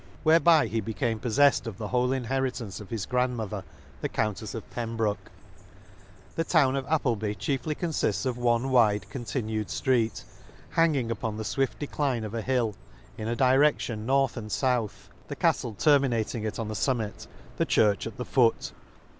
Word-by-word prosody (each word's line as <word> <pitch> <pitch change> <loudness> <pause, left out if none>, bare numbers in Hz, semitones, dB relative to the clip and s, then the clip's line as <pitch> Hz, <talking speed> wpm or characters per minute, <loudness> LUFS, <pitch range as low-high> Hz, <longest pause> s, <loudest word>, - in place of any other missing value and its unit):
Whereby 165 0 +5
he 115 0 -1
became 110 +2 -2
poffeft 130 +3 +3
of 105 -5 -6
the 105 - -5
whole 125 0 +1
inheritance 130 -6 -2
of 100 - -11
his 110 -4 -3
grandmother 120 -6 -1 0.4
the - - -2
Coun 110 -2 0
tefs 110 +2 -7
of 115 - -7
Pembroke 115 -3 -2 1.0
*♦ - - -26
The 165 - 0
town 135 -4 +3
of 135 0 -3
Appleby 115 -9 0
chiefly 140 +5 -2
confifts 145 - -1
of 130 -2 0
one 120 +1 +1
wide 105 -6 +3
continued 110 -4 -3
flreet, 120 -4 0 0.5
hanging 145 -8 +2
upon 110 -1 -3
the 110 - -3
fwift 110 +6 -1
decline 140 -5 -1
of 105 0 -6
a 115 - -2
hill, 120 -3 0 0.4
in 110 -1 -5
a 120 - -1
direction 130 -4 +2
north 135 -2 +2
and 110 -2 -6
fouth; 125 -5 -1 0.2
the - - -5
caftle 110 -4 0
terminating 120 -7 +2
it 110 - -3
on 115 - -3
the 110 - -4
fummit, 110 -1 -2 0.3
the - - +2
church 105 0 +3
at 115 - -9
the 125 - -4
foot. 120 -4 +2
120 Hz, 170 wpm, -27 LUFS, 110-130 Hz, 1.0 s, Whereby